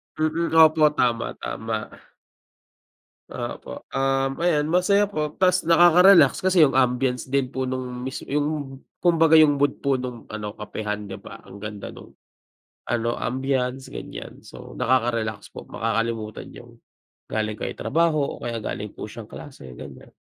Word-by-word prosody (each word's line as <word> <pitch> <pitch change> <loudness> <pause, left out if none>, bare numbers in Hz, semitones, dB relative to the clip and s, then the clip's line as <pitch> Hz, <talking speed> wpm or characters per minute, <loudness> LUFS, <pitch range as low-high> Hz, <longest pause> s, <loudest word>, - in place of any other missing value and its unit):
Mm 160 +2 -1
opo 155 0 +5
tama-tama. 115 -2 -1 1.5
Opo - - -7
um, 135 +1 0
ayan 160 -3 +1
masaya 200 +3 +3
po 155 -7 -3
tas 185 -1 +3
nakaka-relax 175 -2 +6
kasi 185 -3 +4
yung 135 - +4
ambience 125 -1 +1
din 135 -1 0
po 130 -1 -2
nung 125 -1 -4
mis 130 +1 -5
yung 145 -2 -2 0.2
kumbaga 165 -2 +5
yung 150 -3 +6
mood 145 0 0
po 135 -2 +1
nung 125 -3 -6
ano, 105 -1 -6
kapehan 105 -1 -5
di 95 - -7
ba? - - -11
Ang 100 - -12
ganda 105 -1 -7
nung, - - -14 0.7
ano 120 0 -1
ambiance 130 +1 -2
ganyan - - -9
so - - -12
nakaka-relax 115 -4 0
po, - - -7
makakalimutan 115 -1 -3
niyong - - -14 0.6
galing 110 -1 -1
kayo - - -4
ng - - -13
trabaho 165 0 +2 0.2
o - - -14
kaya 115 -1 -3
galing 105 -1 -5
po - - -8
siyang 110 0 -10
klase, 130 - -10
ganyan. - - -11
130 Hz, 145 wpm, -24 LUFS, 115-155 Hz, 1.5 s, nakaka-relax